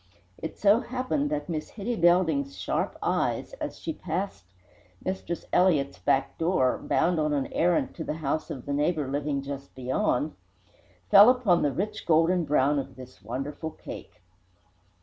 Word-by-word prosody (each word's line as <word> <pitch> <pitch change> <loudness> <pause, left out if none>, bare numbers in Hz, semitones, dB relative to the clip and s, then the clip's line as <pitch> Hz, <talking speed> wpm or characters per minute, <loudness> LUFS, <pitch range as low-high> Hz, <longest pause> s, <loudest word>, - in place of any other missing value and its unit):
It 160 - -5
so 210 +2 +5
happened 260 +4 -2
that 300 0 -2
Miss 155 -3 -4
Hitty 230 +3 -3
Belding's 185 +12 +2
sharp - - -2
eyes, - - 0
as - - -4
she 320 - -4
passed 175 - -4 0.6
Mistress 185 -2 -3
Elliott's 150 -7 +3
back 135 - 0
door, 165 -7 +2
bound 175 -1 +1
on 150 -1 +1
an 140 -2 0
errand 175 0 +2
to 160 - -6
the 155 - -3
house 155 0 -2
of 130 - -6
the 145 - -2
neighbour 150 0 0
living 140 0 -2
just 140 0 -7
beyond, 130 +3 0 0.8
fell 205 +4 +10
upon 240 -9 +3
the 145 - +2
rich 210 +7 -4
golden 165 +2 +3
brown 145 0 +2
of 135 - -6
this 130 -1 -12
wonderful 135 - -4
cake. 155 - -11
160 Hz, 155 wpm, -27 LUFS, 140-190 Hz, 0.8 s, fell